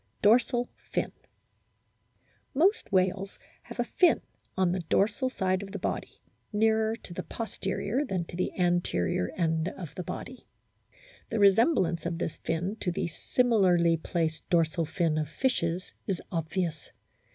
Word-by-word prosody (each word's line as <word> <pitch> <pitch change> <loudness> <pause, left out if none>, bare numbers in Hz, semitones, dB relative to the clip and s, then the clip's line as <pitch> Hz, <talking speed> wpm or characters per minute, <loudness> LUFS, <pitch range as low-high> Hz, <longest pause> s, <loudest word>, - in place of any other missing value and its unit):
DORSAL 240 +3 +4
FIN - - -3 1.4
Most 370 - +3
whales 190 +1 +1 0.2
have - - -11
a - - +4
fin 360 - +4 0.4
on 185 -2 +3
the 185 - 0
dorsal 205 - +1
side 185 -5 0
of 200 0 -8
the - - -2
body, - - -4 0.3
nearer 220 +1 +2
to 185 - -11
the 185 - -3
posterior 210 - -2
than 190 - -2
to 170 - -9
the 180 - -1
anterior 175 - +1
end 160 -1 +1
of 175 -4 -7
the - - -5
body. 245 +8 -7 0.8
The - - -1
resemblance 195 - +4
of 170 -1 -2
this 165 - -3
fin 175 +6 -2
to 180 - -1
the 170 - -2
similarly 180 -5 +3
placed 160 -1 -2
dorsal 165 -1 +2
fin 160 -2 +1
of 150 -1 -2
fishes 180 -5 -1
is 190 -4 -1
obvious. 165 -1 -2
185 Hz, 140 wpm, -29 LUFS, 170-220 Hz, 1.4 s, DORSAL